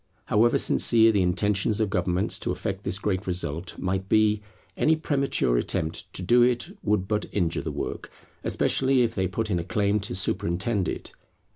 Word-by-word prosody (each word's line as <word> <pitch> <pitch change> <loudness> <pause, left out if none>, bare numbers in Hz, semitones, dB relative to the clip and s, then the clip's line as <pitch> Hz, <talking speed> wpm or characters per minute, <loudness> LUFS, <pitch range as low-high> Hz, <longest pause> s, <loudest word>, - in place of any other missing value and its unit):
However 115 +3 +3
sincere 115 -1 +4
the 100 -3 +2
intentions 100 +4 +1
of 105 -3 0
governments 90 +2 0
to - - -4
effect 95 +2 -4
this 95 - -1
great 95 -2 -2
result 90 -1 -2
might 95 +1 -2
be, 105 -1 +3 0.3
any 160 - +3
premature 140 - 0
attempt 80 +6 -3
to 90 - -3
do 120 +7 +4
it 120 0 +1
would 105 -3 0
but 105 0 -1
injure 85 -5 -1
the - - -4
work, - - -5 0.3
especially 130 -1 +2
if 115 -1 -1
they 95 -3 0
put 110 +4 -3
in 90 - +1
a - - -3
claim 105 +2 0
to 100 -3 -4
superintend 95 +2 -1
it. - - -6
100 Hz, 175 wpm, -25 LUFS, 90-110 Hz, 0.3 s, sincere